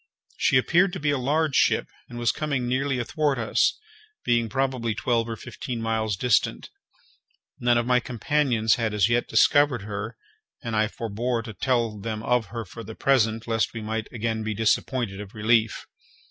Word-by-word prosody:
She 130 Hz, -, +3 dB
appeared 175 Hz, +8 st, +3 dB
to 185 Hz, -, -4 dB
be 145 Hz, -1 st, +1 dB
a 145 Hz, -, +1 dB
large 150 Hz, +3 st, +1 dB
ship, -, -, +3 dB, 0.2 s
and 120 Hz, -, -8 dB
was 120 Hz, -1 st, +2 dB
coming 140 Hz, -5 st, -2 dB
nearly 135 Hz, +2 st, 0 dB
athwart 145 Hz, +3 st, 0 dB
us, 115 Hz, -2 st, +1 dB, 0.5 s
being 120 Hz, -1 st, +2 dB
probably 130 Hz, -4 st, -1 dB
twelve 115 Hz, 0 st, 0 dB
or 115 Hz, -, -3 dB
fifteen 120 Hz, +1 st, -6 dB
miles 110 Hz, -2 st, -1 dB
distant. 120 Hz, 0 st, +1 dB, 0.9 s
None 120 Hz, -1 st, +3 dB
of 120 Hz, -, +1 dB
my 125 Hz, 0 st, +3 dB
companions 120 Hz, -1 st, +1 dB
had 110 Hz, -3 st, -1 dB
as 105 Hz, +1 st, +3 dB
yet 120 Hz, +1 st, +1 dB
discovered 145 Hz, -6 st, +3 dB
her, 105 Hz, +2 st, -5 dB, 0.5 s
and 115 Hz, -2 st, -3 dB
I 110 Hz, 0 st, +3 dB
forbore 115 Hz, +2 st, -3 dB
to 110 Hz, -, -8 dB
tell 115 Hz, 0 st, 0 dB
them 110 Hz, +1 st, -4 dB
of 125 Hz, -3 st, +1 dB
her 115 Hz, 0 st, -6 dB
for 115 Hz, +5 st, -10 dB
the 110 Hz, +1 st, -9 dB
present, 115 Hz, -4 st, +1 dB
lest 115 Hz, 0 st, 0 dB
we 115 Hz, -, -4 dB
might 110 Hz, 0 st, -3 dB
again 115 Hz, -1 st, -2 dB
be 110 Hz, -1 st, -3 dB
disappointed 110 Hz, -1 st, 0 dB
of 105 Hz, 0 st, -11 dB
relief. 110 Hz, +1 st, +1 dB
115 Hz, 175 wpm, -25 LUFS, 110-130 Hz, 0.9 s, She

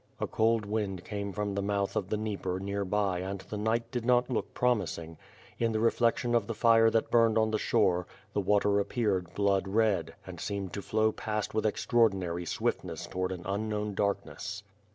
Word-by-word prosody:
A -, -, 0 dB
cold 110 Hz, -1 st, +1 dB
wind 100 Hz, -4 st, -2 dB
came 100 Hz, -2 st, -4 dB
from 105 Hz, +1 st, -2 dB
the 100 Hz, -, -1 dB
mouth 100 Hz, 0 st, -1 dB
of 95 Hz, -2 st, -1 dB
the 105 Hz, -, 0 dB
Dnieper 100 Hz, -4 st, -3 dB
near 100 Hz, +1 st, -2 dB
by 100 Hz, -1 st, 0 dB
and 95 Hz, +2 st, -3 dB
the -, -, -7 dB
night 115 Hz, +2 st, 0 dB
did 120 Hz, -3 st, -2 dB
not 125 Hz, +1 st, +3 dB
look 120 Hz, -, -2 dB
promising. 90 Hz, -9 st, 0 dB, 0.4 s
In 115 Hz, -1 st, +1 dB
the 110 Hz, -, +1 dB
reflection 115 Hz, +1 st, +2 dB
of 120 Hz, -, +2 dB
the 115 Hz, -, -3 dB
fire 115 Hz, -1 st, +5 dB
that 115 Hz, 0 st, 0 dB
burned 115 Hz, -2 st, +4 dB
on 110 Hz, 0 st, +3 dB
the 110 Hz, -, 0 dB
shore, 90 Hz, -6 st, +2 dB, 0.3 s
the 105 Hz, -, +1 dB
water 100 Hz, +1 st, +3 dB
appeared 100 Hz, -5 st, -1 dB
blood 100 Hz, -1 st, +2 dB
red, 105 Hz, 0 st, +1 dB
and -, -, -9 dB
seemed 95 Hz, -2 st, -3 dB
to 100 Hz, -, -3 dB
flow 110 Hz, +2 st, +1 dB
past 110 Hz, -1 st, -3 dB
with 110 Hz, 0 st, +1 dB
ex 105 Hz, -, -2 dB
traordinary 95 Hz, -7 st, +2 dB
swiftness -, -, -2 dB
towards 90 Hz, 0 st, -2 dB
an 90 Hz, -, -10 dB
unknown 105 Hz, +1 st, -2 dB
darkness. 100 Hz, +1 st, -2 dB
105 Hz, 195 wpm, -30 LUFS, 95-110 Hz, 0.4 s, fire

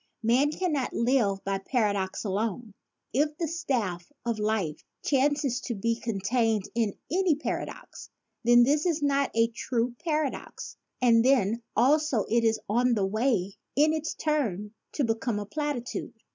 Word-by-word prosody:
Man 250 Hz, +6 st, +3 dB
cannot 305 Hz, -4 st, -1 dB
live 230 Hz, -5 st, +1 dB
by 195 Hz, 0 st, -1 dB
para 215 Hz, 0 st, +1 dB
dox 190 Hz, 0 st, -3 dB
alone. 215 Hz, +2 st, -2 dB, 0.4 s
If 295 Hz, +4 st, +1 dB
the 330 Hz, -, -1 dB
staff 250 Hz, -, -2 dB
of 230 Hz, -2 st, -1 dB
life 210 Hz, -8 st, -1 dB, 0.2 s
chances 275 Hz, -2 st, +1 dB
to 240 Hz, -, -3 dB
be 230 Hz, +3 st, 0 dB
contained 225 Hz, -1 st, 0 dB
in 225 Hz, -4 st, 0 dB, 0.2 s
any 360 Hz, -2 st, +3 dB
paradox, 295 Hz, -, -6 dB, 0.3 s
then 240 Hz, +1 st, +6 dB
this 295 Hz, +6 st, +2 dB
is 320 Hz, -3 st, 0 dB
not 280 Hz, -1 st, +2 dB
a 230 Hz, 0 st, +4 dB
true 235 Hz, +1 st, -2 dB
paradox 310 Hz, -4 st, -3 dB, 0.3 s
and 230 Hz, -2 st, +5 dB
then 235 Hz, -4 st, +3 dB
also 285 Hz, -3 st, +3 dB
it 235 Hz, +1 st, +2 dB
is 225 Hz, -1 st, +2 dB
on 240 Hz, +3 st, +2 dB
the 200 Hz, -3 st, +1 dB
way 210 Hz, -2 st, 0 dB, 0.2 s
in 305 Hz, +2 st, +4 dB
its 315 Hz, 0 st, -3 dB
turn 220 Hz, -, -1 dB, 0.2 s
to 290 Hz, -, 0 dB
become 225 Hz, -1 st, -1 dB
a 205 Hz, -, -3 dB
platitude. 285 Hz, 0 st, -4 dB
235 Hz, 150 wpm, -28 LUFS, 215-285 Hz, 0.4 s, then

